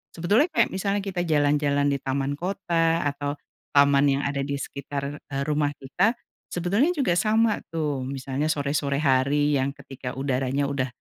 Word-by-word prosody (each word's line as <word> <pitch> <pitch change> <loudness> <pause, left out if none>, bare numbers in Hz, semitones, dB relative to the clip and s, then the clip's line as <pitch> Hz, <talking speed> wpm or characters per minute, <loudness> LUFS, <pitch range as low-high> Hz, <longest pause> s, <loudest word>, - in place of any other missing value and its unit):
sebetulnya, 205 - +3
kayak 325 - +1
misalnya 200 +1 -1
kita 180 -3 -2
jalan-jalan 145 -1 +2
di 140 - -1
taman 135 +2 -2
kota 170 -3 0
atau 145 0 -2 0.4
taman 140 0 +5
yang 140 0 +1
ada 140 0 -1
di 140 +1 -2
sekitar, 140 +1 -5
eee, 140 -1 -4
rumah 145 -1 0
kita 185 - 0 0.3
sebetulnya 205 - +1
juga 180 - +2
sama 220 0 +2
tuh, 145 -5 -2
misalnya 135 +2 -2
sore-sore 140 -1 0
hari 140 +2 +3
yang 140 +1 -1
ketika 135 -2 -8
udaranya 135 +1 -1
udah 135 -2 -1
145 Hz, 155 wpm, -25 LUFS, 140-170 Hz, 0.4 s, taman